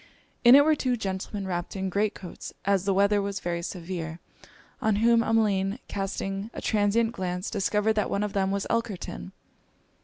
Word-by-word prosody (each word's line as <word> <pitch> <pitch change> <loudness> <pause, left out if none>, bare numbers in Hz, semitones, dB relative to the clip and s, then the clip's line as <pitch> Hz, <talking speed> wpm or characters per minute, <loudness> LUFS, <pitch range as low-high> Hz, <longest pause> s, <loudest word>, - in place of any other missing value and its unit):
In 240 +1 +9
it 285 +1 +7
were 315 - +5
two 255 -4 0
gentlemen 195 0 -4
wrapped 175 0 -3
in 190 0 -2
great 205 +3 0
coats, 180 -3 -9
as 195 -1 +2
the 200 - +2
weather 200 +1 +3
was 200 0 -3
very 170 -1 -2
severe; 170 -2 -5 0.6
on 220 -3 +2
whom 230 +2 +4
Emmeline 210 -3 +1
casting 195 +1 -3
a - - -4
transient 215 +2 +2
glance, 180 -3 -3
discovered 210 +1 +1
that 210 -1 0
one 200 - 0
of 210 - -3
them 190 -1 +1
was 200 0 -1
Elkerton. 225 -5 -3
200 Hz, 175 wpm, -27 LUFS, 190-220 Hz, 0.6 s, In